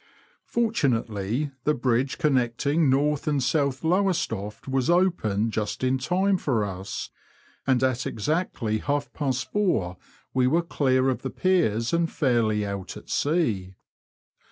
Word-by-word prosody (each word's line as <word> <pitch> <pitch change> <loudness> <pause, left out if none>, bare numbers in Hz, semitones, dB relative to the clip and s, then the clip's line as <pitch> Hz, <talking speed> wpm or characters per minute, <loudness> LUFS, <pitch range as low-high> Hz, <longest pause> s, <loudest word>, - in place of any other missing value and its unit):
Fortunately 130 - 0
the 150 - +2
bridge 130 +3 0
connecting 140 +1 +1
North 145 +3 +1
and 145 -3 +1
South 140 0 0
Lowestoft 160 - 0
was 130 0 0
opened 115 - +2
just 105 +3 -2
in 130 +1 +2
time 190 +7 +1
for 120 -11 0
us, 95 0 -6 0.6
and 130 -1 +3
at 130 -2 +1
exactly 115 - -1
half 145 +3 -2
past 130 -2 -2
four 175 - 0 0.4
we 130 -1 +3
were 165 +6 +2
clear 130 -5 +1
of 130 - 0
the 130 - -3
piers 140 - +1
and 170 0 +1
fairly 115 -6 +1
out 100 -2 -5
at - - -11
sea. 115 - 0
130 Hz, 130 wpm, -25 LUFS, 115-155 Hz, 0.6 s, and